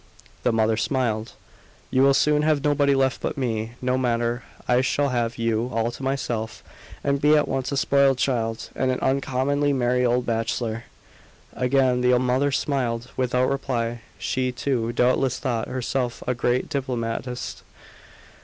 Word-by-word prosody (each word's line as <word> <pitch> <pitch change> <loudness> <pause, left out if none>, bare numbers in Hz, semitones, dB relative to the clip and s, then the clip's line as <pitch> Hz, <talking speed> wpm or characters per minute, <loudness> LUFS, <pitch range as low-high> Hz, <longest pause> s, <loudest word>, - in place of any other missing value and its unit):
The - - +2
mother 110 -1 +2
smiled. 115 -3 -1 0.6
"You 130 - +3
will 135 0 +5
soon 150 +1 +3
have 150 -2 +2
nobody 145 -1 +3
left 135 -1 +1
but - - -3
me. 115 -3 -2
No 125 +1 +1
matter. 120 -1 0 0.3
I 125 0 +4
shall 140 +2 +1
have 120 -2 -1
you 115 +1 0
all 115 0 0
to 120 - -10
myself, 120 -5 -3 0.4
and 140 0 0
be 150 +1 +5
at 150 - +2
once 135 0 -2
a 140 - -1
spoiled 140 -1 +3
child, 115 -3 -1
and 130 - 0
an 130 - +1
uncommonly 140 +2 +1
merry 125 -1 +1
old 125 0 +2
bachelor." 115 0 -2 0.7
Again 125 -1 +2
the 125 0 +4
mother 130 +3 +1
smiled, 125 -4 -1
without 125 0 +1
reply. 120 -4 -2 0.2
She, 130 0 -1
too, 120 -2 -1
doubtless 125 +1 +2
thought 120 -4 -2
herself 125 -1 -2
a 125 - +1
great 120 +1 0
diplomatist. 125 -3 -3
125 Hz, 155 wpm, -24 LUFS, 120-135 Hz, 0.7 s, will